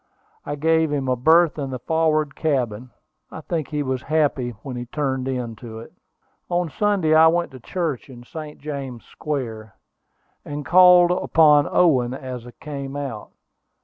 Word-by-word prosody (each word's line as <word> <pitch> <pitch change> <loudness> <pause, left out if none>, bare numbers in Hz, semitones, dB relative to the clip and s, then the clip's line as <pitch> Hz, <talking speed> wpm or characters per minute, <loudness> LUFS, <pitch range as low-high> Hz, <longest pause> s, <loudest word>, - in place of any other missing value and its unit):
I 145 - -2
gave 160 +1 +2
him 140 -2 -1
a 130 - +2
berth 160 +5 +4
in 140 -2 -3
the 130 - -4
forward 155 +1 0
cabin. 125 -6 -1 0.4
I 160 - -9
think 160 -2 -3
he 150 -1 -2
was 130 -2 -2
happy 145 -5 0
when 135 -3 -6
he 120 0 -6
turned 130 -1 -2
into 120 -3 -5
it. 115 - -11 0.6
On 175 -2 -1
Sunday 200 -6 +1
I 160 +1 +7
went 170 +1 +1
to 130 - -11
church 155 -1 -4
in 120 -2 -12
St. 150 +3 -9
James 140 -5 -6
Square, 115 -8 -5 0.7
and 145 0 -6
called 180 0 +7
upon 150 -4 +4
Owen 130 -8 +3
as 125 -3 -7
I - - -10
came 140 -3 -6
out. 135 -7 -5
145 Hz, 160 wpm, -22 LUFS, 125-160 Hz, 0.7 s, I